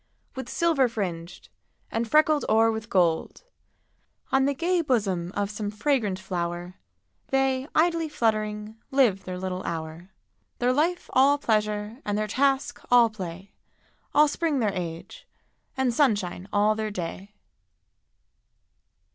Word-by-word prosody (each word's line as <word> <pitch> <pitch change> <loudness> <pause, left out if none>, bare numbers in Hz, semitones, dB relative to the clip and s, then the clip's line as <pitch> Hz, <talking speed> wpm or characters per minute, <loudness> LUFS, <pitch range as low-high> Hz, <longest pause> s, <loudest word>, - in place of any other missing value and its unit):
With 265 - -6
silver 325 -6 +2
fringed, 180 -5 -5 0.4
and 225 0 -2
freckled 305 +1 +4
o'er 225 +1 +4
with 220 0 -5
gold: 175 - +1 0.9
On 270 0 +3
the 280 0 0
gay 345 +4 +1
bosom 200 - 0
of 205 0 -1
some 210 -1 -4
fragrant 210 -3 0
flower 175 -1 -4 0.5
They, 270 0 +1
idly 330 0 +2
fluttering, 215 -3 -1
live 240 -9 +2
their 185 -1 -5
little 185 0 -4
hour; 165 +1 -6 0.5
Their 250 +1 +2
life 335 +6 0
all 275 +3 +5
pleasure, 215 -2 -1
and 205 0 -1
their 215 - 0
task 270 +5 0
all 240 -2 +6
play, 190 -1 -8 0.6
All 300 +1 +5
spring 310 0 -1
their 210 -4 +1
age, 170 -3 -6 0.5
and 260 -2 +1
sunshine 205 -8 0
all 210 +1 +3
their 215 0 -3
day. 195 +2 -6
215 Hz, 130 wpm, -26 LUFS, 190-270 Hz, 0.9 s, all